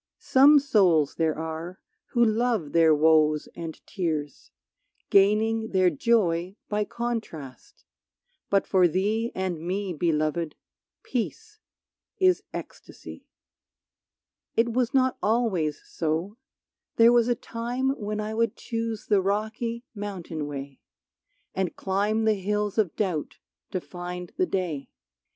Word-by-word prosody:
Some 280 +3 +6
souls 190 - +3
there 160 -2 0
are 160 +3 -5 0.3
who 235 -1 +3
love 220 -8 0
their 165 -2 +5
woes 155 0 +3
and 165 -2 -7
tears, 155 -7 -3 0.6
Gaining 220 +3 +3
their 185 -1 +4
joy 180 -1 +1
by 210 0 0
contrast, 215 - -6 0.6
but 200 -1 +2
for 185 -2 +4
thee 210 +7 0
And 185 -3 -2
me, 185 +3 -3
Beloved, 155 0 0 0.5
peace 425 - -4 0.6
is 370 -1 +3
ecstasy. - - -10 1.3
It 230 0 +2
was 250 0 +1
not 260 -2 +2
always 200 -10 +1
so, 170 +8 -3 0.6
there 230 +1 +6
was 240 -1 +4
a 240 - +2
time 245 +4 -2
When 215 -5 -4
I 215 +1 -3
would 230 0 0
choose 230 -2 -4
the 205 -3 +3
rocky 220 +4 -2
mountain 185 -8 -5
way, 140 -1 -7 0.7
And 190 -2 -2
climb 205 +3 0
the 220 - +4
hills 210 +1 -1
of 195 -7 +1
doubt 180 -8 -2 0.3
to 185 - -2
find 180 0 -7
the 370 - +1
day. 170 - -3
200 Hz, 120 wpm, -26 LUFS, 165-230 Hz, 1.3 s, Some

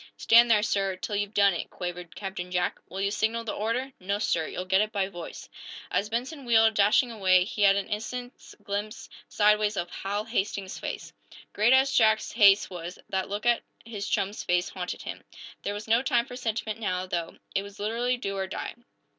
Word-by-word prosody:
"Stand 235 +1 +6
there, 210 -2 +4
sir, 195 -3 0
till 195 +3 -4
you've 205 +1 -2
done 200 -1 +5
it!" 170 - -4
quavered 175 -2 -6
Captain 190 -3 -5
Jack. 180 0 -1
"Will 190 - -5
you 200 0 +1
signal 225 +2 0
the 225 - -3
order?" 235 +5 -2
"No, 200 +2 -1
sir! 165 -6 0
You'll 180 - -5
get 190 +1 +3
it 215 0 -1
by 200 -3 0
voice." 175 -3 -8 0.4
As 210 - 0
Benson 255 +6 -3
wheeled, 225 -2 +4
dashing 215 +5 +4
away, 185 -4 +4
he 210 +2 -5
had 195 -1 +6
an 200 -1 -1
instant's 245 +4 -6
glimpse, 205 +1 -4 0.2
sideways, 210 0 +3
of 175 - -3
Hal 205 +2 -3
Hastings's 200 -4 -2
face. - - -6 0.4
Great 215 +4 +3
as 265 +1 +4
Jack's 220 -1 +3
haste 205 -3 +6
was, 175 0 -7
that 190 -1 -2
look 205 +3 -4
at 240 -1 +3 0.2
his 210 -3 -5
chum's 200 0 -1
face 180 0 +1
haunted 180 -1 -5
him. - - -6 0.4
There 205 - -3
was 205 +1 -7
no 230 +2 +4
time 245 -4 +2
for 245 - -9
sentiment, 225 -3 -3
now, 185 -4 -1
though. 170 -2 -4 0.2
It 195 - +1
was 200 0 -11
literally 235 +4 0
do 195 -5 -4
or 190 -1 -2
die! - - -5
205 Hz, 200 wpm, -27 LUFS, 190-225 Hz, 0.4 s, Stand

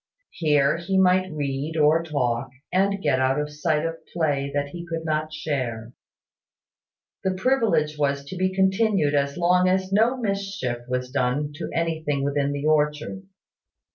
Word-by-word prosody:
Here 150 -2 +2
he 190 +3 -1
might 185 0 +3
read, 145 +1 -3
or 155 +2 +4
talk, 130 -8 -1 0.2
and 200 +1 +1
get 130 - +2
out 130 +2 +2
of 150 0 -3
sight 150 +1 0
of 165 0 -3
play 145 -5 0
that 145 0 -1
he 170 +3 -7
could 165 -1 -4
not 155 0 -1
share. 125 -7 -3 1.3
The 190 0 0
privilege 190 - +1
was 140 -1 0
to 165 - -7
be 185 +1 0
continued 190 -4 +2
as 140 -1 0
long 180 +1 +3
as 190 0 0
no 230 +5 +3
mischief 195 - -2
was 125 0 -2
done 140 +2 0
to 170 - -5
anything 160 -4 -1
within 140 0 0
the 145 +1 -3
orchard. 155 +5 0
155 Hz, 155 wpm, -24 LUFS, 140-185 Hz, 1.3 s, or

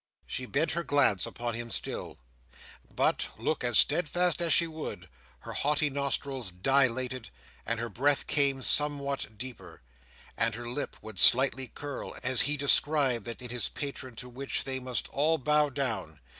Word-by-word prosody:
She 125 - -5
bent 150 +5 0
her 170 - -2
glance 140 - +2
upon 120 0 -4
him 120 +1 -6
still; - - -3 0.8
but, - - +1
look 155 - -2
as 120 -2 +2
steadfast 175 +3 +2
as 170 -1 0
she 170 - +4
would, 155 - -7 0.3
her - - -8
haughty 150 0 0
nostrils 135 -4 -1
dilated, 130 +4 0 0.4
and 115 0 -1
her 120 - -3
breath 135 +6 0
came 140 -2 +1
somewhat 140 -6 +3
deeper, 95 - -9 0.5
and 115 0 +1
her 120 0 -7
lip 125 +5 -5
would 110 -4 -6
slightly 130 +1 +5
curl, 145 +2 -7
as 130 -1 +5
he 145 +1 +1
described 140 -4 +3
that 120 +1 -7
in 125 - -6
his 125 -2 0
patron 135 -3 -6
to 125 - -7
which 130 +3 -3
they 130 -1 -4
must 125 -1 -3
all 155 +3 +1
bow 150 +1 +2
down. 115 - -4
130 Hz, 160 wpm, -29 LUFS, 120-145 Hz, 0.8 s, slightly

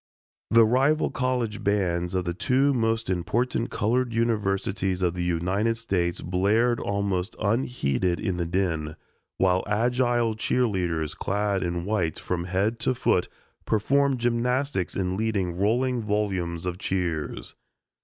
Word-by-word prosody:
The 115 0 +6
rival 135 +7 +2
college 125 -4 -1
bands 90 -3 0
of 90 -1 0
the 85 - -1
two 135 +9 +2
most 115 -2 0
important 115 +7 -1
colored 120 +2 0
universities 95 -4 0
of 85 -2 +2
the 90 -1 -3
United 95 +7 0
States 90 -6 -1
blared 105 +7 +2
almost 100 -1 -1
unheeded 100 - 0
in 95 -5 -2
the 85 -1 -1
din, 80 -4 -1 0.4
while 95 -1 +2
agile 120 +1 +1
cheerleaders 90 -10 0
clad 100 -1 -1
in 85 -1 -2
white 95 -7 0
from 85 -1 -3
head 100 +5 0
to 130 - 0
foot - - +1 0.4
performed 135 +5 +2
gymnastics 120 -2 0
in 95 -1 -1
leading 100 -5 -1
rolling 120 +4 +1
volumes 95 -5 -1
of 90 0 -3
cheers. 90 -6 -3
100 Hz, 130 wpm, -26 LUFS, 90-115 Hz, 0.4 s, The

